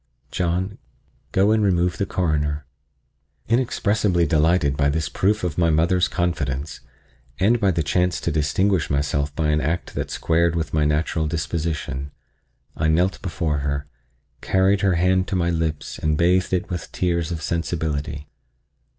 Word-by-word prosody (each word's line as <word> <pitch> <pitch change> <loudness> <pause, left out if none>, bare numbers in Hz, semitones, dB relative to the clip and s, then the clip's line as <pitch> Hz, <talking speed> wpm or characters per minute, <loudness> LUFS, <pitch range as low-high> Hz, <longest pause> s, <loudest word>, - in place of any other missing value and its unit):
John, 90 +3 -1 0.5
go 100 +3 +3
and 110 0 +3
remove 90 -3 +1
the 100 - 0
Coroner." 75 -4 -1 0.8
Inexpressibly 105 -6 +1
delighted 80 -1 +2
by 70 -1 +2
this 80 +2 -1
proof 105 +2 0
of 90 -2 -2
my 85 -1 +3
mother's 85 +3 +3
confidence, 75 -6 -2 0.6
and 110 +6 +3
by 100 -3 +3
the 85 -3 0
chance 90 +4 +1
to - - -1
distinguish 80 +5 +1
myself 70 0 0
by 80 -1 0
an 75 0 +2
act 85 +4 -2
that - - -3
squared 85 0 +1
with 80 -4 -2
my 75 -1 +2
natural 80 +1 0
disposition, 75 -3 -3 0.7
I 80 - 0
knelt 90 +4 +1
before 85 -6 -1
her, 70 0 -2 0.6
carried 95 +1 +2
her 95 -3 +2
hand 90 +2 +2
to - - -2
my 85 -1 +1
lips 80 -3 -3
and 75 -1 0
bathed 90 +2 +2
it 90 -1 0
with 90 -2 -5
tears 85 -2 -1
of 80 -2 -4
sensibility. 75 -4 -2
85 Hz, 150 wpm, -22 LUFS, 75-90 Hz, 0.8 s, go